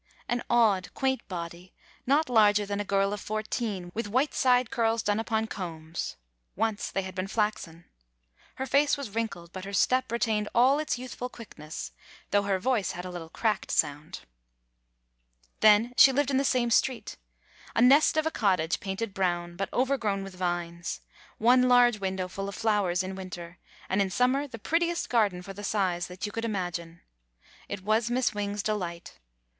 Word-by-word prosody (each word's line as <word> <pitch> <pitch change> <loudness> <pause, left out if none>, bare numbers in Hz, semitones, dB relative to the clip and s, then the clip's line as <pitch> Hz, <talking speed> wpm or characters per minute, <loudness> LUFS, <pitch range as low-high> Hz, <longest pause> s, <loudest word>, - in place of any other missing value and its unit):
An 240 0 -1
odd, 220 -6 +3
quaint 265 -1 0
body, 175 0 -7 0.3
not 290 +4 +3
larger 210 -4 +4
than 200 0 -3
a - - 0
girl 195 0 +1
of 205 - -5
fourteen, 215 -4 -3
with 230 -1 -3
white 255 +8 +1
side 250 -2 +3
curls 230 -3 +1
done 205 +1 +1
upon 220 0 0
combs 165 -6 -5 0.2
— - - -48
once 220 +1 -1
they 195 - -2
had 185 0 -7
been 185 +1 -3
flaxen. 195 -6 -2 0.7
Her 265 - -3
face 280 +3 +3
was 275 -7 -6
wrinkled, 195 -6 -4
but 185 - -6
her 200 +1 -7
step 255 +4 +2
retained 220 -3 0
all 260 +5 +5
its 305 -4 -1
youthful 250 0 -6
quickness, 160 -10 -8 0.4
though 205 - +4
her 200 -1 0
voice 220 -1 0
had 180 +1 -6
a 180 - -6
little 170 -2 -7
cracked 215 +3 -1
sound. 150 0 -1 1.4
Then 215 +3 +5
she 270 - +9
lived 280 +1 +1
in 265 - +2
the 275 - +2
same 245 -3 +1
street. 250 +1 +1 0.6
A - - +3
nest 285 +5 +5
of 315 - +2
a 320 - 0
cottage, 185 - +1
painted 195 +2 -4
brown, 175 -3 -1
but 195 +2 -3
overgrown 235 -7 0
with 195 -1 -8
vines; 175 -1 -3 0.4
one 250 +3 +4
large 245 -3 +5
window 190 -1 -2
full 195 +2 -5
of 200 - -7
flowers 205 -5 +1
in 190 +1 -5
winter, 180 -2 -8 0.3
and 190 +2 +1
in 195 - +1
summer 255 +7 +1
the 235 - -9
prettiest 340 +8 -1
garden 205 -7 +2
for 195 - -8
the 205 +2 -9
size 185 -4 0
that 180 +3 -6
you 205 - -4
could 225 - -4
imagine. 175 -6 -4 0.7
It 200 -2 -5
was 215 +3 +1
Miss 245 -2 +1
Wing's 205 0 -3
delight. 175 -5 -4
205 Hz, 180 wpm, -28 LUFS, 185-240 Hz, 1.4 s, she